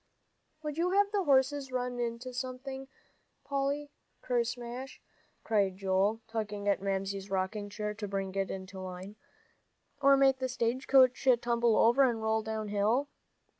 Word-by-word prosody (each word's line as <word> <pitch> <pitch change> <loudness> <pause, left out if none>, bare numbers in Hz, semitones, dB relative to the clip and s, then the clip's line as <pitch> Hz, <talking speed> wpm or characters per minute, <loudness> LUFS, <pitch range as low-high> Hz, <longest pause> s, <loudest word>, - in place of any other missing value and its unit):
"Would 300 +1 -4
you 350 +2 +2
have 405 0 +3
the 400 -3 0
horses 270 0 +2
run 250 -1 -2
into 240 +2 -3
something, 260 +1 -5 0.6
Polly, 280 +1 -1 0.3
kersmash," 240 +1 -3 0.4
cried 200 -4 +1
Joel, 195 +3 +1
tugging 210 -2 -4
at 200 -1 +2
Mamsie's 195 0 -2
rocking 195 +2 -2
chair 210 +1 -4
to 210 0 -5
bring 195 -1 -3
it 195 -1 -1
into 190 0 -7
line, 185 +2 -7 0.9
"or 275 0 +6
make 270 -1 +4
the 260 0 -1
stage 250 +1 -1
coach 260 -1 +5 0.2
tumble 235 -2 +2
over 240 +4 +5
and 240 -4 +3
roll 220 0 +1
down 220 -1 -4
hill?" 220 +8 +1
235 Hz, 145 wpm, -31 LUFS, 205-265 Hz, 0.9 s, or